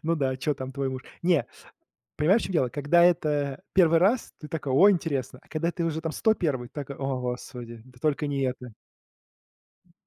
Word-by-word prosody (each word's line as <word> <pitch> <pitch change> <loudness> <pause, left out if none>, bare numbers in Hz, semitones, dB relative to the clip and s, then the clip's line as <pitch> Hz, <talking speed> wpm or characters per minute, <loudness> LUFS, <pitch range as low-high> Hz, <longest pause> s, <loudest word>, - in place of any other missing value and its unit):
Ну 165 +1 +1
да, 135 -3 0
чё 145 +3 -1
там 130 -1 -7
твой 135 0 -2
муж? 130 -1 -5 0.2
Не, 170 -3 +2 0.7
понимаешь, 185 +10 +4
в - - -3
чём 190 - -5
дело, 130 -6 +2
когда 145 +6 +3
это 150 -4 +1
1 170 -3 +5
раз, 215 +8 +2
ты 150 - -9
такой: 145 -4 -3
ой, 200 +9 +7
интересно, 140 -8 -2
а - - -25
когда 165 +2 -1
ты 170 - -3
уже 160 -1 -2
там 160 - -3
101, 155 - 0
такой: 140 -2 -6
"О, 135 -1 -2
Господи, 125 -2 -6
да 125 -1 -19
только 150 -1 0
не 140 -1 -2
это". 125 -2 -4 1.1
М - - -30
145 Hz, 195 wpm, -26 LUFS, 130-165 Hz, 1.1 s, ой